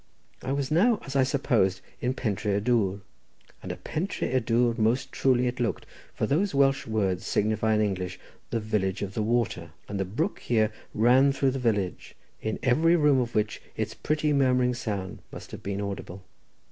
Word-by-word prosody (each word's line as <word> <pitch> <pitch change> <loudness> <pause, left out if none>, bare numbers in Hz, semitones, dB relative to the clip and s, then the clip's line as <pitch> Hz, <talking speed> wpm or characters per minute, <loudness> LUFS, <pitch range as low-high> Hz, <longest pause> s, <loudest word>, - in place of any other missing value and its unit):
I 130 - -3
was 140 0 -1
now, 205 +7 +4
as 140 - -7
I 135 - +5
supposed, 120 -8 +2 0.2
in 125 +1 0
Pentré 105 -4 -1
y - - +2
Dwr, 100 -3 +1 0.6
and - - -5
a - - -4
pentré 170 -4 -3
y 130 - +4
dwr 120 0 +2
most 115 +4 +1
truly 125 -2 +2
it 125 +1 -2
looked, 120 -2 -1 0.3
for - - 0
those 175 +5 +1
Welsh 135 -2 +3
words 100 -5 0
signify 110 +1 +1
in 105 - +2
English 95 -3 -2 0.3
the 115 - -1
village 105 -3 -1
of 95 -1 -5
the 110 - -1
water, 105 -7 -1
and 100 -1 -4
the - - +2
brook 150 - -2
here 110 -2 +1 0.2
ran 125 +5 +5
through 135 -1 +1
the 135 - -3
village, 105 -7 -1 0.3
in 110 0 -2
every 160 +7 +4
room 150 -5 +4
of 120 -1 -2
which 105 0 0 0.2
its - - -2
pretty 150 0 0
murmuring 125 -2 +3
sound 100 -6 -4
must - - -10
have - - -8
been 100 0 -3
audible. 100 -2 -5
120 Hz, 185 wpm, -27 LUFS, 100-135 Hz, 0.6 s, I